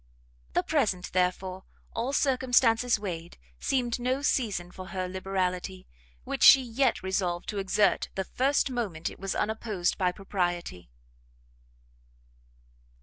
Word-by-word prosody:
The -, -, +2 dB
present, 180 Hz, -1 st, 0 dB
therefore, 185 Hz, +1 st, 0 dB, 0.3 s
all 235 Hz, +4 st, -2 dB
circumstances 250 Hz, -4 st, +3 dB
weighed, 175 Hz, -5 st, -6 dB, 0.2 s
seemed 245 Hz, -3 st, 0 dB
no 255 Hz, +3 st, -1 dB
season 200 Hz, -11 st, 0 dB
for 185 Hz, 0 st, -9 dB
her 185 Hz, -1 st, -3 dB
liberality, 185 Hz, 0 st, -3 dB, 0.4 s
which -, -, -4 dB
she 270 Hz, -, +9 dB
yet 245 Hz, -1 st, 0 dB
resolved 185 Hz, -2 st, -1 dB
to 205 Hz, -, -2 dB
exert 195 Hz, +2 st, +2 dB
the 190 Hz, -, -1 dB
first 270 Hz, +4 st, +1 dB
moment 200 Hz, -10 st, -3 dB
it -, -, -13 dB
was 195 Hz, 0 st, -3 dB
unopposed 210 Hz, -4 st, -1 dB
by 180 Hz, -2 st, +2 dB
propriety. 175 Hz, -, -3 dB
195 Hz, 120 wpm, -28 LUFS, 180-240 Hz, 0.4 s, she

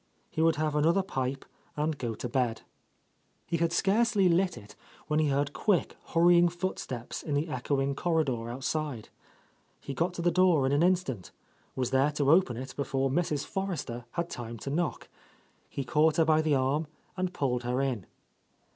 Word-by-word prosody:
He 160 Hz, -, -1 dB
would 165 Hz, 0 st, +4 dB
have 155 Hz, 0 st, -1 dB
another 165 Hz, +6 st, +3 dB
pipe, 135 Hz, -6 st, -3 dB, 0.3 s
and 155 Hz, +1 st, 0 dB
go 120 Hz, -5 st, -4 dB
to 125 Hz, -, -4 dB
bed. 120 Hz, -3 st, -1 dB, 0.8 s
He 170 Hz, -, -1 dB
had 165 Hz, 0 st, +1 dB
scarcely 200 Hz, +2 st, +3 dB
lit 180 Hz, 0 st, +2 dB
it, 105 Hz, -, -12 dB, 0.3 s
when 150 Hz, 0 st, +1 dB
he 155 Hz, -, +3 dB
heard 140 Hz, +1 st, 0 dB
quick, 200 Hz, -5 st, +1 dB
hurrying 175 Hz, +1 st, +5 dB
footsteps 170 Hz, -9 st, -4 dB
in 150 Hz, -, -2 dB
the 145 Hz, +4 st, 0 dB
echoing 135 Hz, +1 st, 0 dB
corridor 140 Hz, -8 st, 0 dB
out 130 Hz, +3 st, -6 dB
side. 145 Hz, -8 st, -2 dB, 0.7 s
He 140 Hz, -, -6 dB
got 170 Hz, +6 st, -1 dB
to 170 Hz, -, -4 dB
the 175 Hz, -, +3 dB
door 175 Hz, -5 st, +4 dB
in 135 Hz, -, +1 dB
an 145 Hz, +2 st, +3 dB
instant, 175 Hz, -, +1 dB, 0.5 s
was 130 Hz, -2 st, -1 dB
there 135 Hz, +2 st, +3 dB
to 145 Hz, -1 st, +2 dB
open 160 Hz, -9 st, +4 dB
it 130 Hz, +1 st, -7 dB
before 135 Hz, -1 st, -1 dB
Mrs. 150 Hz, -2 st, 0 dB
Forrester 170 Hz, -11 st, -4 dB
had 170 Hz, 0 st, -1 dB
time 120 Hz, -6 st, -6 dB
to 135 Hz, -, -4 dB
knock. 170 Hz, +2 st, -2 dB, 0.6 s
He 140 Hz, -, -4 dB
caught 155 Hz, +3 st, +2 dB
her 165 Hz, -, +4 dB
by 155 Hz, 0 st, +4 dB
the 155 Hz, -2 st, +2 dB
arm 140 Hz, +4 st, +1 dB, 0.3 s
and 185 Hz, -1 st, -1 dB
pulled 125 Hz, -7 st, -1 dB
her 125 Hz, +1 st, -1 dB
in. 130 Hz, -8 st, -1 dB
150 Hz, 180 wpm, -29 LUFS, 130-170 Hz, 0.8 s, hurrying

